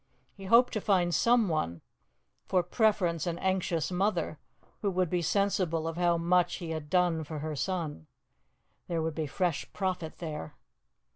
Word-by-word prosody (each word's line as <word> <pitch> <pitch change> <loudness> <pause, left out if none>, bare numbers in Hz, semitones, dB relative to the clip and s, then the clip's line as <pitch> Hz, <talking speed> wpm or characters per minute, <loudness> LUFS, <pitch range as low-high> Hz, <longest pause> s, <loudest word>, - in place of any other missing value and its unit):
He 195 - -11
hoped 235 +5 +5
to 215 - -1
find 180 -4 +2
someone 165 - +2 0.7
for 185 -2 +2
preference 175 -4 +1
an 170 -1 -1
anxious 185 -3 0
mother, 180 -5 0 0.4
who 205 - +1
would 185 -3 0
be 180 -1 +1
sensible 175 -3 +1
of 165 - -3
how 175 -1 +2
much 175 +1 +2
he 170 -3 -6
had 155 -2 -5
done 175 -2 +2
for 155 +1 -6
her 155 +1 -4
son. 155 - -3 0.8
There 165 -2 -1
would 160 0 -1
be 155 -1 -2
fresh 175 +2 -1
profit 185 -4 -3
there. 155 - -6
175 Hz, 155 wpm, -30 LUFS, 160-190 Hz, 0.8 s, hoped